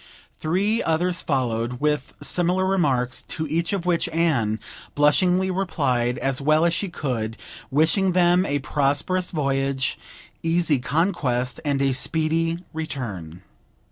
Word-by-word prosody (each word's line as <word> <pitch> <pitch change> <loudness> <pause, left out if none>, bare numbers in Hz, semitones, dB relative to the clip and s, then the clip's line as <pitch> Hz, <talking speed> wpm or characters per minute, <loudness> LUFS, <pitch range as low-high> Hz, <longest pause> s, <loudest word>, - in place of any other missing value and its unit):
Three 195 +8 +1
others 175 +2 +1
followed 120 -5 -1
with 150 -2 -1
similar 180 +1 +2
remarks, 135 -10 +1
to 160 - -3
each 165 +3 -1
of 195 -4 -2
which 175 -2 +1
Anne 135 -10 +1 0.4
blushingly 180 +6 +3
replied 140 -10 0
as 135 +1 -1
well 155 +3 +3
as 170 - +2
she 195 +2 -2
could, 115 -9 -3 0.3
wishing 165 +7 +2
them 180 0 +4
a 145 -5 0
prosperous 145 +6 0
voyage, 135 -3 -1 0.4
easy 165 -3 +2
conquest, 130 -4 0
and 140 -2 0
a 135 -1 +2
speedy 160 +4 +1 0.2
return. 100 - -5
155 Hz, 125 wpm, -23 LUFS, 130-175 Hz, 0.4 s, them